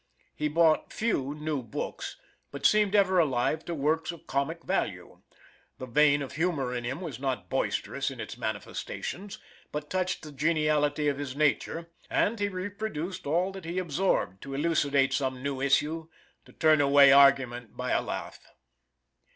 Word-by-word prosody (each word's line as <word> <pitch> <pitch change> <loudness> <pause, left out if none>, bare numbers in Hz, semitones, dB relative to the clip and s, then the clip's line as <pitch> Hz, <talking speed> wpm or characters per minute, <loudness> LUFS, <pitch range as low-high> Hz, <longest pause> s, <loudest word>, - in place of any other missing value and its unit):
He 150 - -1
bought 160 +1 +3
few 145 - -1
new 150 -2 -2
books, 115 -4 -5 0.3
but - - -7
seemed 210 -1 +4
ever 190 -2 +4
alive 150 0 +1
to 170 - -3
works 160 +3 0
of 170 - -13
comic 155 +5 -2
value; - - -3 0.6
the 130 - -6
vein 145 +3 +3
of 135 - -7
humor 150 -6 -1
in 120 -1 -3
him 130 +8 -4
was 155 -9 -6
not 135 -1 -3
boisterous - - -1
in - - -9
its - - -6
manifestations, 195 +2 -5 0.3
but 150 0 -5
touched 185 -1 -1
the 155 - -8
geniality 150 0 +1
of 140 -1 0
his 140 -2 -5
nature, 155 +3 0 0.2
and 225 +1 +1
he 205 - +1
reproduced 185 -3 -5
all 175 +6 +1
that 190 -3 -9
he 170 +2 -4
absorbed, 170 - 0
to 135 0 -6
elucidate 145 -3 +2
some 130 -2 -1
new 140 -2 -2
issue, 150 +4 +1 0.4
or - - -16
turn 155 -2 +4
away 140 0 +7
argument 135 -4 +4
by - - -2
a - - +2
laugh. - - -5
150 Hz, 160 wpm, -28 LUFS, 140-170 Hz, 0.6 s, away